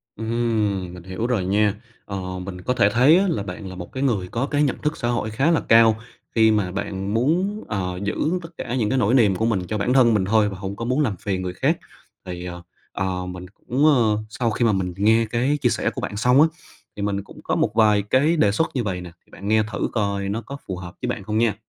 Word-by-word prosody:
Ừm, 110 -5 -1
mình 90 -1 -10
hiểu 95 +5 -3
rồi 115 -7 0
nha, 105 +2 +2 0.3
ờ, 95 -2 -5
mình 90 0 -7
có 125 - 0
thể 100 -5 +3
thấy 130 - +5
là 110 - -1
bạn 95 +1 -7
là 95 - -8
một 90 -1 -8
cái 130 - -3
người 105 -9 0
có 115 +8 -2
cái 145 0 +1
nhận 140 - 0
thức 150 +1 -1
xã 120 - -2
hội 120 -2 -1
khá 135 +9 +2
là 165 - +3
cao 115 -1 +6 0.4
khi 110 -1 +5
mà 105 -4 +1
bạn 100 0 -3
muốn, 180 - +1
ờ, 90 -3 -3
giữ 100 - -2 0.3
tất 165 - -9
cả 120 - -4
những 110 -5 0
cái 130 - +1
nỗi 120 -2 +2
niềm 110 -7 +4
của 110 - 0
mình 110 -5 +1
cho 110 - -2
bản 105 +5 0
thân 125 -3 +5
mình 100 -3 +2
thôi 105 +1 +3
và 95 - -7
hông 95 +1 -5
có 115 - -5
muốn 130 +5 +1
làm 115 -9 0
phiền 95 0 -2
người 90 -1 -4
khác. - - +1 0.5
Thì, 90 -1 -6
ờ, 90 -1 -7 0.3
ờ, 95 -1 -2
mình 90 0 -7
cũng, 125 +8 -1
ơ, 120 -8 +4
sau 115 +1 -1
khi 120 - 0
mà 115 - +4
mình 95 -3 -1
nghe 110 +3 +4
cái 120 +6 0
chia - - +3
sẻ - - 0
của - - -6
bạn 100 - -4
xong 125 +5 +4
á, 160 - +7 0.5
thì 105 - -6
mình 100 -1 -1
cũng - - -14
có - - -1
một - - +1
vài 105 -2 +4
cái 130 +11 +2
đề 105 -9 +4
xuất 160 +10 -1
như 125 - 0
vầy 95 -4 -3
nè, 90 -1 -9
thì - - -29
bạn 100 - -8
nghe 110 +1 +3
thử - - -1
coi 100 -3 -1
nó 110 +3 -2
có 140 +5 -8
phù 95 - -4
hợp 90 -1 -9
với - - -2
bạn 125 -4 -3
không 105 +2 -2
nha. 110 -3 +2
105 Hz, 265 wpm, -23 LUFS, 95-120 Hz, 0.5 s, á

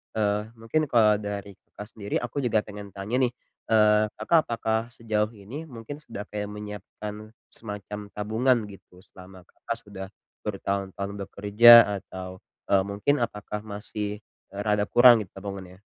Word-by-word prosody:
eee, 105 -1 +1
mungkin 115 +7 -1
kalau 110 -6 +4
dari 100 -1 -6
Kakak 105 - -12
sendiri 100 -1 -4
aku 120 +3 -6
juga 110 -3 +2
pengen 105 -2 -10
tanya 100 +5 -2
nih. 120 - -3 0.4
Eee, 105 -1 +5
Kakak 165 -2 +2
apakah 110 -1 0
sejauh 110 -1 -1
ini 115 +10 -8
mungkin 125 0 -8
sudah 115 -9 -8
kayak 105 -1 -3
menyiapkan 105 +1 -8 0.2
semacam 105 -1 -4
tabungan 110 +2 +1
gitu 90 -2 -15
selama 95 0 -14
Kakak 115 - -5
sudah 100 -3 -8 0.4
bertahun-tahun 100 -1 -3
bekerja 105 +4 +7 0.3
atau, 95 0 -8 0.3
eee, 95 -1 +4
mungkin 100 +9 0
apakah 105 -3 -4
masih, 105 0 -5 0.3
eee, 100 - -4
rada 105 -1 +1
kurang 120 +1 +7
nih - - -26
tabungannya? 95 -1 -8
105 Hz, 145 wpm, -26 LUFS, 100-115 Hz, 0.4 s, bekerja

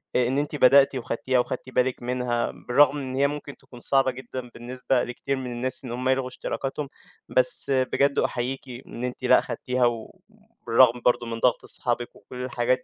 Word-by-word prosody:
إ 125 -1 +3
إن 130 +3 -1
أنتِ 145 +1 -2
بدأتِ 135 0 +5
وخدتيها 130 +1 -1
وخدتِ 130 +1 -3
بالِك 125 0 0
منها، 125 -1 -1
بالرغم 140 +3 +2
إن 130 -2 -5
هي 140 +1 +3
ممكن 145 0 -7
تكون 125 - -15
صعبة 135 +1 +2
جدًا 125 0 -8
بالنسبة 125 +1 -1
لكتير 125 +3 -3
من 130 -2 -5
الناس 130 +2 -1
إن 120 - -6
هُم 125 +2 -2
يلغوا 130 -1 +1
إشتراكاتهم، 135 +2 -5 0.4
بس - - +5
بجد 135 +1 +1
أحيّيكِ 125 +2 -2 0.3
إن 120 - -8
أنتِ 125 0 -5
لأ - - +5
خدتيها 125 0 -1
و 120 - -3 0.5
بالرغم 120 +1 +5
برضه 120 -1 +2
من 115 0 -5
ضغط 125 0 +2
أصحابك 120 -1 -4
وكلّ 125 0 -9
الحاجات 125 0 0
125 Hz, 180 wpm, -25 LUFS, 120-135 Hz, 0.5 s, بدأتِ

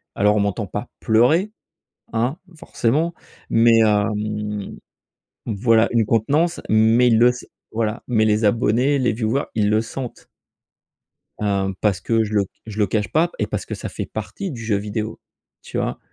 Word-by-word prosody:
alors 105 +1 +3
on - - +2
m'entend 100 +1 -1
pas 105 +6 -5
pleurer, 125 - +3 0.6
hein, 120 +7 0 0.2
forcément, 155 +5 0 0.4
mais 115 0 +5
hem 105 -1 0 0.7
Voilà, 115 +1 +3
une 115 -2 +2
contenance 145 +11 +1
mais 110 +3 +4
il 115 - +4
le 120 +1 +6
sai 125 - -10 0.2
voilà 110 0 -2
mais 110 -3 +2
les 105 0 +2
abonnés, 120 +6 +2
les 125 - +2
viewers 115 +5 -1
ils 105 -2 +2
le 110 +1 +3
sentent 125 +2 -7 1.1
hem, 100 -2 0
parce 100 -4 +1
que 115 -1 +1
je 105 0 -5
le 100 -2 +2 0.2
je 110 -1 -7
le 105 - +3
cache 105 +1 -1
pas 170 +3 +2
et - - +1
parce - - -4
que - - -5
ça - - -6
fait - - -5
partie 195 -3 -5
du 120 -4 -7
jeu 110 -2 +1
vidéo, 105 +2 -4 0.4
tu - - -6
vois? - - -2
110 Hz, 165 wpm, -21 LUFS, 105-120 Hz, 1.1 s, le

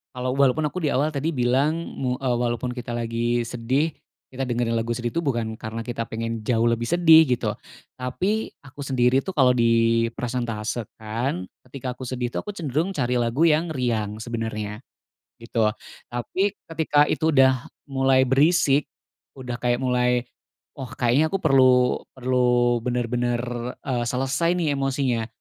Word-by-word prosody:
kalau 125 0 -2
walaupun 140 +2 +2
aku 180 +4 -3
diawal 145 +1 +1
tadi 145 +4 -1
bilang 135 +4 +1 0.3
mu 125 -1 0
eee, 125 -3 0
walaupun 120 +1 -1
kita 120 -1 -6
lagi 120 +1 -1
sedih, 130 +7 -1 0.4
kita 135 - -3
dengerin 120 -1 0
lagu 115 +1 -1
sedih 120 0 -3
tuh 170 - 0
bukan 115 -6 -1
karena 115 0 -6
kita 115 -1 -3
pengen 115 0 -4
jauh 115 0 +1
lebih 115 0 0
sedih 165 -2 +7
gitu, 125 - 0 0.4
tapi 185 - -2 0.2
aku 135 +2 -11
sendiri 130 -1 +2
tuh 190 - -4
kalau 125 -2 +5
dipresentasekan 115 -2 -1 0.2
ketika 130 -1 -5
aku 130 - -9
sedih 125 -1 -2
tuh - - -2
aku 205 - -5
cenderung 160 0 -2
cari 125 -8 -1
lagu 120 +7 +2
yang 160 +2 +2
riang 115 -6 -1
sebenarnya, 110 -2 -4 0.6
gitu. 115 -2 0 0.4
Tapi 190 +12 -1 0.2
ketika 150 -2 +3
itu 160 - +1
udah 130 -2 +4 0.2
mulai 135 -1 +3
berisik, 140 +1 +3 0.5
udah 125 -2 -6
kayak 120 0 +1
mulai, 125 -1 +1 0.5
oh, 130 -2 -5
kayaknya 130 +6 +2
aku 195 - -1
perlu 130 -4 +4 0.2
perlu 125 -1 +2
bener-bener, 120 0 0 0.4
eee, 125 -3 -1
selesai 135 +7 0
nih 160 -5 0
emosinya, 135 -4 0
125 Hz, 145 wpm, -24 LUFS, 120-135 Hz, 0.6 s, sedih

